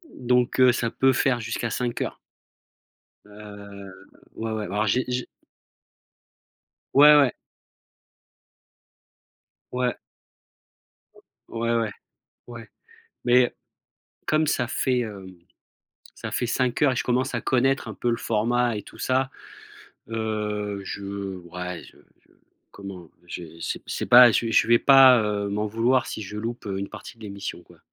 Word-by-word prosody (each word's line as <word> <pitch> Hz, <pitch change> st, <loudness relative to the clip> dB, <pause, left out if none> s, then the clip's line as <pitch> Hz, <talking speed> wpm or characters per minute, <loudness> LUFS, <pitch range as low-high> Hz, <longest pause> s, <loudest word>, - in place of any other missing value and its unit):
Donc 125 Hz, 0 st, +1 dB
heu, 130 Hz, -1 st, +7 dB
ça 120 Hz, -1 st, -1 dB
peut 135 Hz, +2 st, +2 dB
faire 125 Hz, -1 st, +1 dB
jusqu'à 115 Hz, +1 st, -3 dB
5 120 Hz, +1 st, -3 dB
heures. -, -, -4 dB, 1.1 s
Heu, 100 Hz, -2 st, -11 dB, 0.4 s
ouais, 110 Hz, 0 st, -4 dB
ouais, 110 Hz, -1 st, -3 dB
alors 105 Hz, +2 st, -1 dB
j'ai 125 Hz, +6 st, +2 dB
j 125 Hz, -1 st, -2 dB, 1.7 s
Ouais, 150 Hz, +2 st, +8 dB
ouais! 140 Hz, -4 st, +5 dB, 2.4 s
Ouais. 125 Hz, -1 st, -1 dB, 1.2 s
O -, -, -20 dB, 0.4 s
ouais, 115 Hz, 0 st, +1 dB
ouais. 115 Hz, -2 st, 0 dB, 0.6 s
Ouais, 120 Hz, -2 st, -10 dB, 0.6 s
mais 125 Hz, 0 st, +4 dB, 0.7 s
comme 155 Hz, 0 st, +2 dB
ça 120 Hz, -4 st, 0 dB
fait, 130 Hz, -1 st, 0 dB
hem, 100 Hz, -5 st, -6 dB, 0.8 s
ça -, -, -7 dB
fait 125 Hz, -, -1 dB
5 125 Hz, +2 st, -1 dB
heures 145 Hz, -, +5 dB
et 125 Hz, -, -2 dB
je -, -, -1 dB
commence 125 Hz, +2 st, 0 dB
à 120 Hz, -, -2 dB
connaître 130 Hz, -1 st, +1 dB
un 110 Hz, -, -6 dB
peu 120 Hz, +6 st, -1 dB
le 115 Hz, -, 0 dB
format 115 Hz, +1 st, 0 dB
et 105 Hz, -, -6 dB
tout -, -, -15 dB
ça. 130 Hz, +1 st, 0 dB, 0.8 s
Heu, 105 Hz, -2 st, -3 dB
je 100 Hz, -1 st, -5 dB
ouais, 90 Hz, 0 st, -6 dB
je -, -, -17 dB, 0.2 s
je -, -, -33 dB, 0.4 s
comment? 95 Hz, -4 st, -10 dB, 0.2 s
j'ai 85 Hz, -1 st, -9 dB
c'est -, -, -4 dB
c'est -, -, -4 dB
pas 125 Hz, 0 st, +8 dB
je 115 Hz, +1 st, 0 dB
je -, -, +4 dB
vais 120 Hz, 0 st, +5 dB
pas, 135 Hz, -3 st, +7 dB
heu, 105 Hz, -1 st, -2 dB
m'en 105 Hz, +1 st, -1 dB
vouloir 120 Hz, +4 st, +1 dB
si -, -, -5 dB
je 105 Hz, +1 st, -7 dB
loupe, 115 Hz, +2 st, -5 dB
heu, 95 Hz, -1 st, -3 dB
une 100 Hz, -, -5 dB
partie 120 Hz, -, -11 dB
de 110 Hz, -, -14 dB
l'émission, 100 Hz, -1 st, -6 dB
quoi. -, -, -20 dB
115 Hz, 145 wpm, -24 LUFS, 105-125 Hz, 2.4 s, Ouais